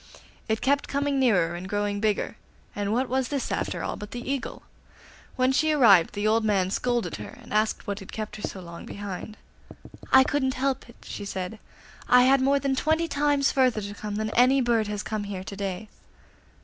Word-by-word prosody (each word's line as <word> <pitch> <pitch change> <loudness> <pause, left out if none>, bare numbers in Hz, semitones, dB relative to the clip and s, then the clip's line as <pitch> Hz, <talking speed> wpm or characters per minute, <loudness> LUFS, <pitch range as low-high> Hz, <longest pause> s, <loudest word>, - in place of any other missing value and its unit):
It 220 0 0
kept 280 +1 +1
coming 280 0 0
nearer 185 -10 +3
and 180 +2 -6
growing 205 0 -1
bigger, 210 0 0 0.4
and 205 0 -2
what 250 +4 +1
was 260 0 0
this 280 -3 -3
after - - -2
all - - -3
but 210 -1 -8
the 245 +3 -5
Eagle? 275 -4 -4 0.7
When 255 0 +2
she 310 +4 +2
arrived 205 - +5
the 205 +1 0
old 225 +1 +3
man 195 -3 +1
scolded 240 +2 -1
her, - - -9
and 240 - -11
asked 215 +1 +1
what 205 -1 -3
had 195 - -11
kept 215 -1 -5
her - - -10
so 190 - -5
long 170 -1 -10
behind. 205 +1 -7 0.7
'I 265 0 +8
couldn't 265 -1 0
help 265 -1 -1
it,' 235 - -17
she - - -6
said; 190 +1 -5 0.5
'I 250 0 +7
had 265 +1 +5
more 275 +2 +3
than 275 -1 0
twenty 320 +4 +1
times 285 -2 +2
further 255 -5 +2
to 205 0 -6
come 205 0 -5
than 215 +1 -2
any 255 +4 +4
bird 235 -4 +2
that - - -4
has 210 0 -3
come 215 -1 -3
here 195 -2 -5
to 200 - -7
day. 195 +1 -4
220 Hz, 205 wpm, -26 LUFS, 205-265 Hz, 0.7 s, I